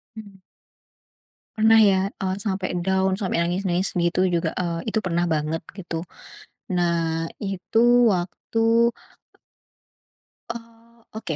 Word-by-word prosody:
Hmm. 205 -3 -11 1.2
Pernah 220 +1 +5
ya, 195 -3 +5 0.2
eee, 190 -1 -1
sampai 190 -3 -2
down, 190 0 +1
sampai 190 -4 -2
nangis-nangis 180 +2 -1
begitu 170 +1 +1 0.2
juga, 170 - 0
eee, 170 -2 -2
itu 220 +1 0
pernah 175 -1 0
banget 155 +1 -1 0.2
gitu. 170 -3 -5 0.7
Nah, 165 -2 0
itu 195 +2 -1 0.3
waktu 225 +6 +1 1.6
eee, 230 0 -14
oke. 215 -8 -5
190 Hz, 105 wpm, -23 LUFS, 170-220 Hz, 1.6 s, Pernah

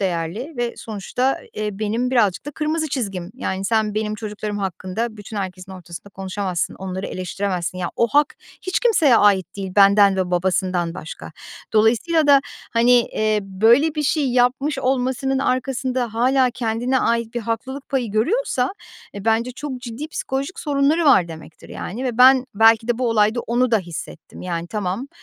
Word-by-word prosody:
değerli 185 - -3
ve 240 -1 -2
sonuçta, 230 +5 -2 0.2
eee, 210 -2 -4
benim 225 +4 -1
birazcık 215 -2 +1
da - - -3
kırmızı 310 +1 -2
çizgim. 195 -9 -4
Yani 195 -6 -3
sen 220 -1 +1
benim 215 0 -1
çocuklarım 210 -1 -5
hakkında 195 +4 -3
bütün 205 +1 -9
herkesin 190 -1 -5
ortasında 175 +1 -10
konuşamazsın, 190 -2 -3
onları 190 0 -5
eleştiremezsin. 185 -1 -3
Ya, 175 - -3
o 235 - +3
hak 290 +3 +2 0.3
hiç 370 - -1
kimseye 325 - +4
ait 190 -3 +3
değil, 190 -2 -5
benden 200 -1 +6
ve 185 -1 -1
babasından 180 -1 0
başka. 85 - -9 0.4
Dolayısıyla 240 +9 +3
da, 280 -1 +7 0.3
hani, 235 +1 +3
eee, 215 -2 0
böyle 230 +11 +3
bir 300 - -1
şey 290 -1 +1
yapmış 260 +4 +1
olmasının 260 +1 0
arkasında 255 -2 -1
hâlâ 255 +2 +3
kendine 245 +2 -1
ait 235 0 0
bir 240 - -1
haklılık 260 +5 -4
payı 250 -6 -1
görüyorsa, 260 - 0 0.4
e, 200 0 -7
bence 230 +2 +1
çok 265 -2 -6
ciddi 245 +5 -6
psikolojik 275 +2 -4
sorunları 295 +3 +1
var 180 - +5
demektir, 160 0 -12
yani 240 +8 -6
ve 245 -2 -3
ben 260 0 +7
belki 225 +2 +5
de 240 0 +1
bu 250 -2 +1
olayda 215 +2 +2
onu 245 +2 0
da 225 - +4
hissettim. 170 -3 -9
Yani 170 -1 -3
tamam, 210 +6 -3
225 Hz, 160 wpm, -21 LUFS, 195-260 Hz, 0.4 s, da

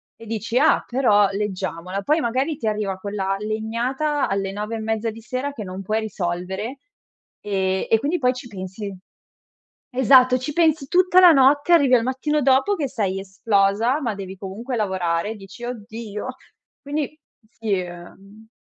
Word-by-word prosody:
e 230 - -13
dici: 225 +2 -1
"Ah, 310 +3 +4
però, 210 -6 +3
leggiamola." 195 -2 -3
Poi 305 +7 +2
magari 265 +4 0
ti 225 - -3
arriva 210 -3 -1
quella 195 -1 -2
legnata 235 +7 -1
alle 195 -1 -1
9 210 +3 -4
e - - -4
mezza 220 +1 -1
di 225 +1 -9
sera 255 +5 -3
che 225 - -6
non 185 0 -6
puoi 215 +3 -1
risolvere 190 +4 -4 0.6
e 190 -2 -1
e 225 - +5
quindi 310 +7 -1
poi 250 -1 +2
ci 250 0 -9
pensi 195 -1 -7 0.9
esatto, 255 0 +5
ci 255 +4 -5
pensi 315 -3 +2
tutta 365 0 +5
la 360 -2 +9
notte, 285 +2 +4
arrivi 280 -6 +6
al 235 - +3
mattino 280 +4 0
dopo 270 +10 +3
che 300 -7 -2
sei 195 -5 -1
esplosa, 200 +5 +1
ma 230 -6 -1
devi 190 -1 -7
comunque 205 +7 -5
lavorare, 190 -1 -1
dici: 200 +4 -12
"Oddio!" 225 -2 -6 0.5
Quindi, 295 +1 -4 0.3
sì, 225 -2 -5
ehm, 195 +5 -12
225 Hz, 160 wpm, -22 LUFS, 195-265 Hz, 0.9 s, la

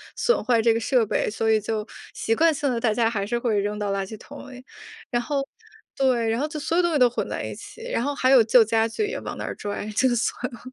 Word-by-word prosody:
损 480 - +1
坏 235 -2 +3
这 230 0 +4
个 225 - 0
设 240 0 +2
备， 210 - 0
所 220 +1 0
以 220 - +4
就 215 0 -3 0.3
习 225 - -1
惯 325 +8 +4
性 285 -2 -1
地 235 - -1
大 230 -2 +1
家 225 +1 +2
还 200 -3 -2
是 240 +2 -1
会 230 -4 0
扔 205 +1 -2
到 205 -1 -2
垃 195 0 -1
圾 215 +3 -9
桶 280 +3 -11
里。 255 0 -12 0.5
然 240 -1 +1
后， 275 +2 -2 0.5
对， 255 -4 +1
然 225 +3 0
后 300 - 0
就 305 0 -6
所 325 - -2
有 355 - +4
东 345 -1 +1
西 310 - +2
都 250 -3 +6
混 240 - -3
在 - - -4
一 - - -5
起， 460 - -11
然 230 - 0
后 285 +1 -2
还 260 -1 +2
有 260 -4 +7
旧 230 +2 +6
家 225 +1 +2
具 420 - -2
也 475 - -4
往 - - -7
那 - - -5
儿 - - -4
拽， 205 0 -5
就 260 +3 +3
算 245 +2 -2
了。 240 - -11
240 Hz, 300 characters per minute, -24 LUFS, 220-270 Hz, 0.5 s, 有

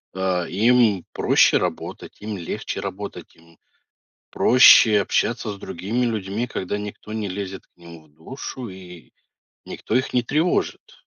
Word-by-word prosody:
а, 95 -2 -1
им 110 -2 +3
проще - - +4
работать, - - -5
им 105 -1 -5
легче 85 - -5
работать, 100 +1 -7
им 85 0 -23 0.7
проще 115 -4 +6
общаться 100 - -1
с - - -9
другими 110 +8 -3
людьми, 110 +1 -3
когда 100 -2 -4
никто 105 +1 -8
не 110 -2 -3
лезет 95 0 -6
к - - -55
ним 85 -2 -13
в - - -25
душу 125 - -8
и 90 -5 -12 0.6
никто - - -5
их 130 - 0
не 120 - +2
тревожит. 155 +8 -1
100 Hz, 140 wpm, -22 LUFS, 90-115 Hz, 0.7 s, проще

